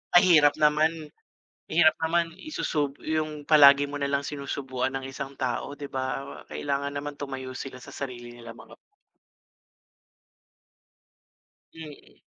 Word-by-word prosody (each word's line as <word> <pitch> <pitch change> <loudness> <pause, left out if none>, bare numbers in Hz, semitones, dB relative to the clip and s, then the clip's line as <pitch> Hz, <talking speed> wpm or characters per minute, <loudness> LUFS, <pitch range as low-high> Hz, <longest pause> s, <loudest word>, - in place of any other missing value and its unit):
Ang 175 - +9
hirap 155 -5 +6
naman, 155 +1 +1 0.6
hirap 160 0 +5
naman 165 0 +1
isusub 150 - -3
yung 155 -2 -3
palagi 145 -2 +7
mo 145 - -8
nalang 140 0 -1
sinusubuan 135 -2 -3
ang 135 - -9
isang 135 0 -7
tao 130 +3 -3
di 145 - -5
ba? 135 +1 -4
Kailangan 140 0 -2
naman 145 +1 -4
tumayo 130 -2 -6
sila 130 -1 -7
sa 125 - -12
sarili 120 -3 -7
nilang 115 -1 -11
mga - - -13
p - - -27 3.0
Mm. 150 - -12
145 Hz, 125 wpm, -26 LUFS, 135-155 Hz, 3.0 s, Ang